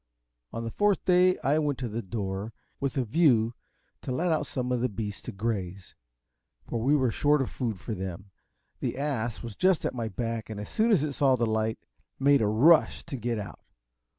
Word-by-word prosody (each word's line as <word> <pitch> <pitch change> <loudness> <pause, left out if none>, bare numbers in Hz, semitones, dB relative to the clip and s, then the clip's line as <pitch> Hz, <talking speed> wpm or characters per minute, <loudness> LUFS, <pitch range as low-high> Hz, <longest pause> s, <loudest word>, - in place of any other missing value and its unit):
On 115 - -4
the 115 - -4
fourth 205 - +1
day 185 0 +4
I 145 +3 +3
went 145 -3 0
to 125 - -3
the 115 +1 -3
door, 100 0 -4 0.3
with 140 0 -2
a 130 - +2
view 120 -3 +3 0.5
to - - -5
let 170 +7 0
out 150 -2 0
some 125 -1 -3
of 125 -1 0
the 125 - +1
beasts 105 -1 -5
to - - -7
graze, 95 -3 -4 0.7
for 120 - -2
we 140 +5 +3
were 130 -5 +2
short 150 +3 +3
of 135 - -2
food 115 -7 -3
for 110 - -5
them. 95 0 -6 0.5
The - - -3
ass 125 -6 -2
was 115 -3 -7
just 185 -3 +2
at - - -1
my 115 -3 -3
back, 115 +1 -4
and 110 -2 -5
as 105 - -6
soon 225 +1 +2
as 180 -9 +4
it 150 -2 -2
saw 135 -1 +3
the 120 -1 +1
light, 110 0 0 0.4
made 140 -1 +4
a 105 - +2
rush 145 +10 +4
to - - -6
get 120 -1 -2
out. 105 - -7
120 Hz, 210 wpm, -28 LUFS, 110-145 Hz, 0.7 s, day